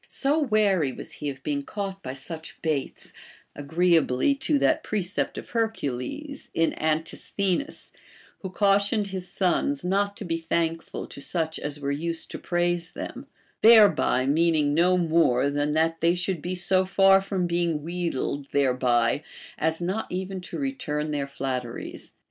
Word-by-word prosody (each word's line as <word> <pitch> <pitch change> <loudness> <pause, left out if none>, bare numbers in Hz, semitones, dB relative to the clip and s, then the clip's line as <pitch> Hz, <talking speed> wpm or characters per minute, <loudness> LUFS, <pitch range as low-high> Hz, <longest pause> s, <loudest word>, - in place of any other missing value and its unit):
So 285 +3 +1
wary 210 - +2
was - - -7
he 145 - -4
of 135 -1 -8
being 145 -1 -1
caught 195 +4 -5
by 130 0 -6
such 160 +4 -7
baits, 150 -4 -3 0.4
agreeably 160 - +2
to 280 +2 +1
that - - +2
precept 200 -2 -2
of - - -7
Hercules 230 - -3
in 165 0 +2
Antisthenes,* 175 - -2 0.5
who 190 - -6
cautioned 200 +2 +2
his 185 -1 -5
sons 175 -5 0
not 200 +2 0
to 205 - -6
be 165 -1 -1
thankful 165 0 -2
to 140 - -10
such 160 0 -2
as 150 0 -4
Avere 140 -1 -2
used 165 0 -4
to - - -6
praise 175 0 -1
them, - - -7 0.2
— - - -38
thereby 215 - +6
meaning 150 0 +2
no 180 +4 +4
more 160 -6 +3
than 145 +1 0
that 165 +1 +1
they 170 +2 +3
should 180 -2 -2
be 180 +3 -3
so 185 +1 +2
far 195 0 +5
from 190 -2 -1
being 170 -3 0
wheedled 165 -5 -3
thereby 125 -2 +2 0.3
as 160 +2 -1
not 190 +5 -2
even 190 +1 -4
to 180 - -7
return 160 - -2
their 145 -2 -2
flat 135 -2 -2
teries. 120 -1 -9
170 Hz, 155 wpm, -26 LUFS, 145-195 Hz, 0.5 s, thereby